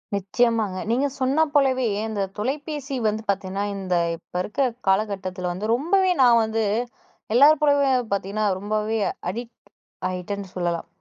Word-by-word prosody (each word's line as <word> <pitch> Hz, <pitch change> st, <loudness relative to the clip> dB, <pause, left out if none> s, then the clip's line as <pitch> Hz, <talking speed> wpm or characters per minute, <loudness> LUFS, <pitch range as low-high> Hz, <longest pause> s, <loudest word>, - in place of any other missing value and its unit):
நிச்சயமாங்க. 210 Hz, 0 st, +1 dB
நீங்க 270 Hz, +4 st, +2 dB
சொன்னா 270 Hz, +4 st, +3 dB
போலவே 265 Hz, -3 st, +3 dB, 0.2 s
இந்த 215 Hz, -2 st, -3 dB, 0.2 s
தொலைபேசி 280 Hz, +4 st, -3 dB
வந்து 215 Hz, +1 st, -1 dB
பாத்தீங்கன்னா, 195 Hz, 0 st, -1 dB
இந்த 190 Hz, -2 st, -2 dB, 0.2 s
இப்ப -, -, -33 dB
இருக்குற 270 Hz, +8 st, 0 dB, 0.2 s
காலகட்டத்துல 190 Hz, -2 st, 0 dB
வந்து 215 Hz, +5 st, -2 dB
ரொம்பவே 370 Hz, +8 st, +2 dB
நான் 235 Hz, -2 st, +6 dB
வந்து 220 Hz, 0 st, -1 dB, 0.7 s
எல்லார் 290 Hz, +5 st, +6 dB
போலவே 285 Hz, -2 st, +4 dB, 0.2 s
பாத்தீங்கன்னா 200 Hz, +2 st, -1 dB
ரொம்பவே 215 Hz, +2 st, -1 dB, 0.3 s
அடிக்ட் 235 Hz, +4 st, -7 dB, 0.5 s
ஆயிட்டேன்னு 185 Hz, +1 st, -5 dB
சொல்லலாம். 175 Hz, -2 st, -2 dB
220 Hz, 125 wpm, -23 LUFS, 195-265 Hz, 0.7 s, நான்